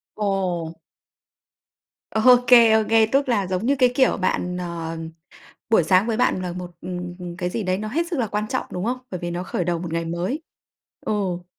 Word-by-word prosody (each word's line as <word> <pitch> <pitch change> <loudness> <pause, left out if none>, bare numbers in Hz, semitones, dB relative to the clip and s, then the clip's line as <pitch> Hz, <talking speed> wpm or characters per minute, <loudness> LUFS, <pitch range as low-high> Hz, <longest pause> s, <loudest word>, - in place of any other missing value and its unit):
Ồ. 185 -5 -1 1.4
Ô 250 +3 +6
kê, 235 -2 +7
ô 220 0 +4
kê. 225 0 +5
Tức 270 +4 +1
là 205 -6 +1
giống 185 +4 -2
như 280 +2 +2
cái, 255 -2 +5
kiểu, 260 -1 +3
bạn, 180 -1 -1
ờ, 170 -2 -5 0.7
buổi 220 -7 +4
sáng 185 +5 +3
với 225 -1 0
bạn 185 - +1
là 180 -1 -3
một, 180 -1 -7
ừ, - - -7 0.3
ừ, 180 - -7
cái 180 -1 -2
gì 220 +4 -3
đấy 185 0 0
nó 215 +2 -4
hết 330 +9 -1
sức 335 -6 -3
là 230 - 0
quan 210 +1 -2
trọng, - - -2
đúng 180 +3 -3
không? 250 +2 -1
Bởi 180 - -4
vì 175 0 -4
nó 175 +1 -3
khởi 180 - -2
đầu 170 -1 -1
một 170 -2 -5
ngày 165 0 -1
mới. 175 - -3 0.6
Ồ, 185 -4 -2
190 Hz, 210 wpm, -23 LUFS, 180-225 Hz, 1.4 s, kê